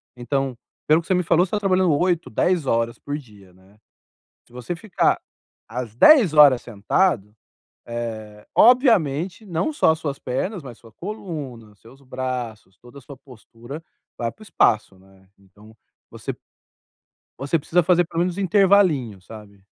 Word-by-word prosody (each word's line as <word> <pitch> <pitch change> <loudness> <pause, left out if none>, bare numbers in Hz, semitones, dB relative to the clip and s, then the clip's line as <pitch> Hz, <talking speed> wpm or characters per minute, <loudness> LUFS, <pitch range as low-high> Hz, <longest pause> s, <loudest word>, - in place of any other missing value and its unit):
Então, 135 0 -3 0.3
pelo 155 +2 +4
que 170 - -18
você 190 - +1
me 180 0 +1
falou, 170 +2 +3
você 180 - -15
tá 210 - 0
trabalhando 185 -4 +2
8, 175 -2 0
10 170 +6 0
horas 115 -1 0
por 145 0 -5
dia, 105 -9 -16
né. 95 +3 -24 0.7
Se - - -24
você 125 +8 -5
ficar 185 +3 0 0.5
as 115 -2 -6
10 230 - +6
horas 145 -5 +7
sentado, 105 - -1 0.5
eh, 110 -3 -7
obviamente 200 - +3
não 180 - -2
só 290 - +3
as 160 - -3
suas 140 -3 -4
pernas, 175 - -4
mas 125 -4 -10
sua 115 - -17
coluna, 145 - -8
seus 120 +6 -19
braços, 125 -6 -6
toda 120 +3 -16
a - - -18
sua 135 +1 -12
postura, 125 +3 -12 0.3
vai 115 -1 -3
para - - -25
o - - -10
espaço, 110 - +1
né. 95 0 -23
Então 105 +3 -20 0.4
você - - -6
p - - -20 1.0
você 140 +5 0
precisa 175 +4 +1
fazer 175 +1 +3
pelo 165 0 -3
menos 180 0 -1
um 200 - -4
intervalinho, 185 - +3
sabe? 100 0 -14
135 Hz, 165 wpm, -22 LUFS, 115-175 Hz, 1.0 s, horas